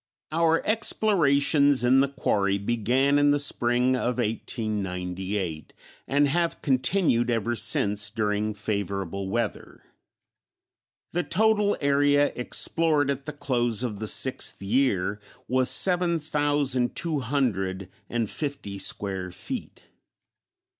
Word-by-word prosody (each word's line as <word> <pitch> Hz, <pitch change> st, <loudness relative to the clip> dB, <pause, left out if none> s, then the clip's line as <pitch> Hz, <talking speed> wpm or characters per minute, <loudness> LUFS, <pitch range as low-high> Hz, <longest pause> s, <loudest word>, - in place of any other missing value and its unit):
_ -, -, -2 dB
Our 165 Hz, 0 st, +2 dB
explorations 145 Hz, -, +3 dB
in 130 Hz, +2 st, +4 dB
the 140 Hz, -, +3 dB
quarry 100 Hz, -7 st, 0 dB
began 120 Hz, +7 st, +1 dB
in 145 Hz, 0 st, +4 dB
the 145 Hz, -, +3 dB
spring 125 Hz, -2 st, +1 dB
of 125 Hz, -1 st, -2 dB
1898, 95 Hz, -, -4 dB, 0.3 s
and 145 Hz, +1 st, +2 dB
have 170 Hz, +4 st, -1 dB
continued 130 Hz, -2 st, +1 dB
ever 120 Hz, 0 st, -1 dB
since 100 Hz, -2 st, +1 dB
during 105 Hz, 0 st, -2 dB
favorable 100 Hz, -2 st, -4 dB
weather. 115 Hz, +1 st, -4 dB, 1.3 s
The 175 Hz, -, 0 dB
total 205 Hz, +5 st, +2 dB
area 145 Hz, 0 st, +2 dB
explored 150 Hz, +3 st, +1 dB
at 140 Hz, 0 st, -5 dB
the 150 Hz, -, -5 dB
close 120 Hz, -5 st, -1 dB
of 105 Hz, -5 st, -4 dB
the 110 Hz, -, -4 dB
sixth 130 Hz, +4 st, +1 dB
year 105 Hz, -2 st, 0 dB, 0.3 s
was 130 Hz, +1 st, +2 dB
seven 175 Hz, -2 st, +2 dB
thousand 145 Hz, -4 st, 0 dB
two 165 Hz, -4 st, 0 dB
hundred 100 Hz, -8 st, -2 dB, 0.2 s
and 115 Hz, -2 st, -1 dB
fifty 140 Hz, -8 st, -5 dB
square 95 Hz, -2 st, -1 dB
feet. -, -, -7 dB
125 Hz, 115 wpm, -25 LUFS, 105-145 Hz, 1.3 s, in